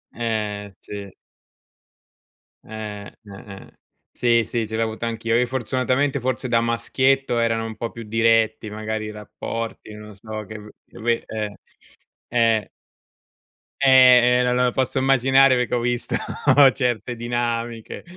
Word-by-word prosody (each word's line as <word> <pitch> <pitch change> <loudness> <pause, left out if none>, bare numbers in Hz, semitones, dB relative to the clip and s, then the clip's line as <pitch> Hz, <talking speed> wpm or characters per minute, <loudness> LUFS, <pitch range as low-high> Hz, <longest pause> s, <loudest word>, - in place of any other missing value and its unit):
Eh, 105 -3 -3
sì. 100 -1 -8 1.5
Eh, 105 -2 -7
eh, - - -15 0.4
eh. 95 - -14 0.3
Sì, 120 -1 +2
sì, 115 0 -3
ce 110 - -5
l'ho 115 - +1
avuto 110 +1 -4
anch'io, 115 0 -1
io 125 +1 +3
fortunatamente 130 +3 -1
forse 130 0 -3
da 115 -1 +3
maschietto 120 +2 +1
erano 115 -1 0
un 110 -1 -7
po' 115 +1 -4
più 115 - -9
diretti, 115 0 +1
magari 110 +1 -4
i 105 - -6
rapporti, 110 +1 -7
non 105 0 -11
so 110 +2 -7
che 110 +2 -9
uhm, 105 0 -12 0.2
lo - - -14
ve 115 0 0
eh, 105 -2 -4 0.7
eh. 115 -2 +1 1.1
Eh, 125 -2 +6
eh - - +2
no 125 0 +1
lo 125 0 +2
posso 130 0 0
immaginare 135 0 +4
perché 125 -1 -1
ho 125 - +2
visto 120 0 -2 0.6
certe 120 -2 -2
dinamiche, 120 -1 -3
115 Hz, 140 wpm, -22 LUFS, 110-125 Hz, 1.5 s, Eh